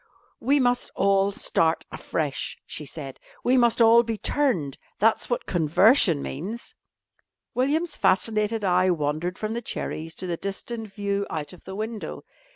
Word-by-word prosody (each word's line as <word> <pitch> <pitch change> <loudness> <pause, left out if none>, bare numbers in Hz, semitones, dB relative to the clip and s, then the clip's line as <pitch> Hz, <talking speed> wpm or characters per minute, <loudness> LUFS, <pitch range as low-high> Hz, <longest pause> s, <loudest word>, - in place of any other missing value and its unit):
"We 280 +4 +3
must 245 -1 +1
all 195 0 +3
start 165 -4 +1
afresh," 145 -4 -3
she 150 - -6
said. 135 -4 -8 0.2
"We 250 - +3
must 240 -2 +3
all 230 0 +7
be 230 -2 -3
turned 205 - 0 0.2
that's 220 +2 +2
what 240 - -1
conversion 170 - +4
means." 195 - -6 0.8
William's 300 +6 0
fascinated 215 +2 +1
eye 185 0 +3
wandered 160 +2 -1
from 215 0 -3
the 235 - -3
cherries 160 -7 -5
to - - -6
the 175 -2 -2
distant 215 +3 -5
view 200 0 -2
out 155 +1 -4
of 180 - -16
the 190 - -7
window. 220 +1 -5
200 Hz, 150 wpm, -25 LUFS, 170-235 Hz, 0.8 s, all